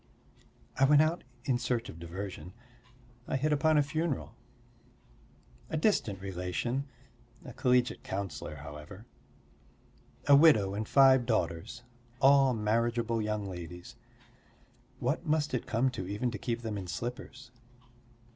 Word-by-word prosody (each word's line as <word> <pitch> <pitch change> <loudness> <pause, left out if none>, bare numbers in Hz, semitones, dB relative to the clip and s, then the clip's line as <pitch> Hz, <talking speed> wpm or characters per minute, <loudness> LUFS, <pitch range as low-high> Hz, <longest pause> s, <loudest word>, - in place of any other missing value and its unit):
I 135 - +6
went 145 +2 +6
out 160 +3 -1 0.2
in 125 -3 +1
search 120 -1 -1
of 80 - -10
diversion, 90 0 -7 0.7
I - - -1
hit 150 +3 +1
upon 155 +1 +3
a 145 - +5
funeral. 155 0 -2 1.4
A 160 - -2
distant 150 - +1
relation 95 +8 -3 0.6
a 125 - -9
collegiate 125 0 +1
counsellor, 95 -6 -5
however. 75 +8 -10 1.2
A 145 - +7
widow 140 -11 +5
and 105 +1 -3
five 130 -3 +5
daughters, 90 +2 -2 0.4
all 135 -2 +5
marriageable 115 +1 0
young 105 -1 -2
ladies. 90 -1 -8 1.0
What 145 +7 -2
must 150 -2 +1
it 125 - -2
come 125 +4 +1
to 95 -7 -5
even 105 +5 -2
to 105 - -6
keep 120 -1 -3
them 110 -3 -3
in 95 - -7
slippers. 120 +4 -6
120 Hz, 125 wpm, -30 LUFS, 95-135 Hz, 1.4 s, A